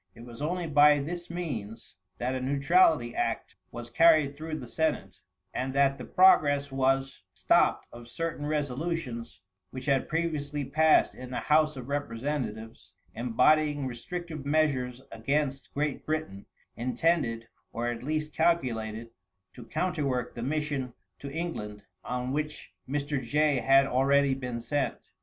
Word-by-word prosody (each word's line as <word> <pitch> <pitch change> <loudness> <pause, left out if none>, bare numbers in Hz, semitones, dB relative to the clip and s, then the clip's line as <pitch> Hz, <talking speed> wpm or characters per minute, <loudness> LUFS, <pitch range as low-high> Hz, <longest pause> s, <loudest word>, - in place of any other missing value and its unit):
It 115 - -11
was 120 +2 -11
only 175 +3 -1
by 150 -1 +6
this 170 +5 -5
means 125 - -6 0.2
that 125 +2 -2
a 130 - -3
neutrality 140 -1 +3
act - - -2
was 120 0 -8
carried 155 -1 +5
through 155 +1 -5
the 125 - -8
senate, 160 +4 -2 0.3
and 130 +1 -3
that 140 -1 +3
the 125 - -6
progress 145 -7 +4
was 135 -3 0
stopped - - +3
of 120 0 -11
certain 150 +3 -4
resolutions 145 -4 -3 0.3
which 130 0 -8
had 140 -2 +1
previously 150 -3 -2
passed 155 +3 +4
in 125 0 -9
the 125 - -4
House 155 0 +3
of 125 -1 -7
Representatives, 125 -4 -4 0.2
embodying 145 +5 +2
restrictive 155 +5 -6
measures 140 -4 0
against 135 +3 -2
Great 145 -1 -1
Britain, 155 -11 -4 0.3
intended, 120 -1 0 0.2
or 115 - -3
at 120 -1 -2
least 155 +3 -2
calculated, 115 -9 0 0.4
to 120 - -11
counterwork 145 -6 -1
the 120 - -7
mission 140 -2 -2 0.2
to 140 - -7
England 140 -11 -5 0.2
on 125 +1 -3
which 150 +1 -4 0.2
Mr. 145 0 -1
Jay 150 +3 +2
had 135 +2 +5
already 135 +1 +3
been 125 -3 -4
sent. 145 +3 -1
140 Hz, 140 wpm, -28 LUFS, 125-155 Hz, 0.4 s, by